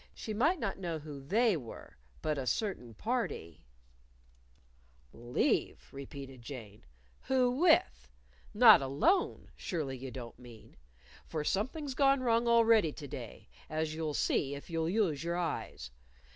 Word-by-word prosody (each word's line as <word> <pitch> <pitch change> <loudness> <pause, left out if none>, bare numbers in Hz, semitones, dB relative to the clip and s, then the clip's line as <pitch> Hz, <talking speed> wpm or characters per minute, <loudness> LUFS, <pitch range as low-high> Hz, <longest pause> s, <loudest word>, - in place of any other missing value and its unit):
She 220 - -5
might 305 - +2
not 195 - -3
know 170 -4 -3
who 150 -2 -8
"They" 215 - +2
were. 125 -8 -9 0.3
But 155 -2 0
"a 130 - -4
certain 125 - -2
party" 215 - -3 1.5
"Leave?" 120 +1 -1
repeated 135 -2 -9
Jane, 115 -5 -9 0.4
"Who 255 -2 +3
with? 65 - +3 0.4
Not 220 - +8
alone, 140 - +1
surely 150 -7 -3
you 130 +1 -7
don't 120 -2 -9
mean. 120 -3 -14 0.5
For 155 -2 -3
something's 265 - -2
gone 275 0 +3
wrong 235 -1 +2
already 230 -7 +5
to 145 - -8
day, - - -9 0.2
as 155 0 -2
you'll 155 -2 -3
see 140 0 0
if 140 +4 -10
you'll 165 0 0
use 175 -8 +1
your 170 +1 -1
eyes. 165 - -4
160 Hz, 135 wpm, -32 LUFS, -, 1.5 s, Not